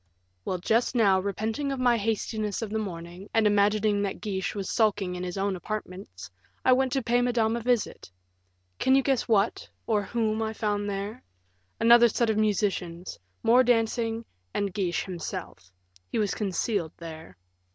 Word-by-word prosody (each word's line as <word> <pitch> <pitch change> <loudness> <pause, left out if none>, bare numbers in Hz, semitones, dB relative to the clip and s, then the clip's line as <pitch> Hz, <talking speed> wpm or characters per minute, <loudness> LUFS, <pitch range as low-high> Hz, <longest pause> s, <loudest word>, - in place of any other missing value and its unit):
"Well, 185 - -1
just 225 +8 +1
now, 200 -5 +4
repenting 220 +8 -2
of 270 - -3
my 245 -1 +4
hastiness 215 -1 -2
of 215 - -5
the 220 - 0
morning, 175 -1 -7
and 225 -1 +4
imagining 205 0 +3
that 200 -1 -2
Guiche 195 -2 -3
was 195 -2 -3
sulking 205 -4 +1
in 180 0 -5
his 180 +1 -4
own 195 0 0
apartments, 180 - -7 0.3
I 255 - +7
went 260 0 +2
to 270 - 0
pay 240 +1 +2
Madame 235 -2 +1
a - - -1
visit. 240 - -1 0.7
Can 260 - +4
you 270 - +4
guess 270 -1 +1
what, 215 -1 +1 0.2
or 215 -2 +2
whom, 220 +1 -1
I 220 0 -2
found 205 -2 -1
there? 200 +4 -4 0.6
Another 235 +1 +7
set 230 +1 +1
of 215 - -1
musicians; 195 -5 -1 0.2
more 245 +3 +6
dancing, 230 -1 +1 0.3
and 200 -2 -1
Guiche 185 -3 -1
himself 165 - -7 0.4
he - - -1
was 210 -3 +1
concealed 200 -3 -1
there." 160 - -10
210 Hz, 165 wpm, -27 LUFS, 190-230 Hz, 0.7 s, I